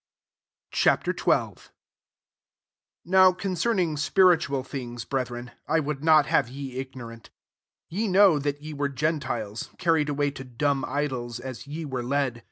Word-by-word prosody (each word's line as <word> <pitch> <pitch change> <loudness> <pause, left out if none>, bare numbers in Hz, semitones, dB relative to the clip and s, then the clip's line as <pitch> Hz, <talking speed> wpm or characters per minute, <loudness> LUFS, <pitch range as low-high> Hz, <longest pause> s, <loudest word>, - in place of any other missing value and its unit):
Ch. - - 0
XII. - - -3
1 - - +2 1.5
NOW 185 +1 +6
concern 195 +4 -1
ing 165 -5 0
spiritual 145 -2 +3
things, 120 -3 -6
bretbreo, 125 -2 -3 0.2
1 160 0 +2
Would 150 -1 -4
not 155 -2 +6
have 125 -3 +2
ye 135 -1 -7
ignorant 120 -4 -8 0.7
2 - - -8
Ye 220 +1 +1
know 190 -4 +5
that 145 +1 -3
ye 155 0 -6
were 145 -1 -1
gen 155 +3 0
tiles, 115 -6 -4
carried 165 -4 +2
away 145 0 0
to 135 - -8
dan* 135 +2 -1
idols, 130 -5 -3
as 130 +1 -8
ye 155 +3 -5
were 130 -3 -3
led. 130 -1 -1
145 Hz, 155 wpm, -26 LUFS, 130-160 Hz, 1.5 s, NOW